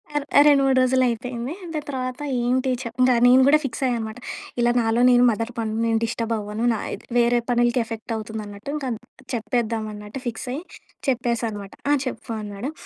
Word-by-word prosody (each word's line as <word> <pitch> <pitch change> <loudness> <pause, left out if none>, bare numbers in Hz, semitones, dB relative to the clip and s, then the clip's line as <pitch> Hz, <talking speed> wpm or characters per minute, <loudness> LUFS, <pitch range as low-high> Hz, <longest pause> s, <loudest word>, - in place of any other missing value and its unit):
అర్ 295 -1 0
ఆ - - +10
2,3 275 -2 +5
రోజులు 255 0 +3
అయిపోయింది. 240 +3 -3 0.2
దాని 305 -2 -3
తర్వాత 255 -2 -3 0.2
ఏంటి 255 +2 +1
చప్ 235 -1 -8
ఇంగ 255 0 +5
నేను 250 +1 +7
గూడా 295 +2 +7
ఫిక్స్ 240 -1 -4
అయ్యా 245 - +1
అనమాట. 220 +1 -6 0.4
ఇలా 240 0 +4
నాలో 225 +1 +1
నేను 245 0 +6
మదన 230 +1 -2
పడను. 220 -1 -2
నేను 225 -1 +2
డిస్టర్బ్ 230 0 -2
అవ్వను. 210 +1 -4
నా 220 - -2
ఇద్ - - -8
వేరే 240 0 +4
పనులకి 240 0 +3
ఎఫెక్ట్ 225 0 -5
అవుతుంది 220 0 -5
అన్నట్టు, 205 +6 -7
ఇంక 295 -2 -4 0.5
చెప్పేద్దాం 225 0 -1
అన్నట్టు 210 +5 -8
ఫిక్స్ 240 +2 -4
అయ్యి 300 +6 -4 0.5
చెప్పేశా 240 -2 0
అనమాట. 200 -2 -8 0.2
"ఆ! - - +6
చెప్పు" 250 -2 -5
అన్నాడు. 210 +6 -5
235 Hz, 185 wpm, -23 LUFS, 220-255 Hz, 0.5 s, ఆ